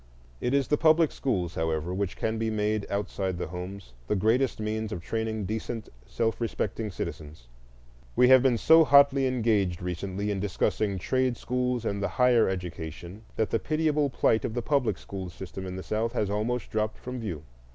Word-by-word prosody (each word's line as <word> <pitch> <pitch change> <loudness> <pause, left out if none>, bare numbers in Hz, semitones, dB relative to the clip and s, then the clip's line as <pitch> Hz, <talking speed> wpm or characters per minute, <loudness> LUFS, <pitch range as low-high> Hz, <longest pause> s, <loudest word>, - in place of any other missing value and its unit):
It 125 +3 0
is 140 -3 +2
the 150 - +2
public 160 -1 +5
schools, 90 -11 -1
however, 80 +1 -1
which 95 -1 -2
can 110 0 -1
be 110 0 0
made, 105 -1 -1
outside 95 -2 -2
the 90 - -3
homes, 90 -4 -7
the - - +1
greatest 115 +6 +2
means 110 0 -2
of 100 - -3
training 110 -1 -2
decent 110 +2 -4 0.2
self 115 0 -1
respecting 115 -1 -2
citizens. 75 -7 -7 0.7
We 125 - +6
have 130 -1 +8
been 130 -2 +3
so 160 +6 +6
hotly 140 -2 +5
engaged 110 -8 +1
recently 95 +3 -3
in 100 - -2
discussing 100 +1 0
trade 130 +5 0
schools 125 -1 -1
and 100 -1 -1
the 100 - +1
higher 125 -4 +3
education 90 +1 -6
that 110 - 0
the 115 - +2
pitiable 155 -2 +1
plight 110 -3 +2
of 110 - -3
the 120 - -1
public 140 -2 +1
school 95 -2 -7
system 95 +1 -8
in 90 - -5
the 95 - -6
South 115 +2 -1
has 105 -5 0
almost 115 +4 -2
dropped 110 0 -1
from 125 0 -6
view. 90 -10 -5
110 Hz, 185 wpm, -27 LUFS, 95-125 Hz, 0.7 s, have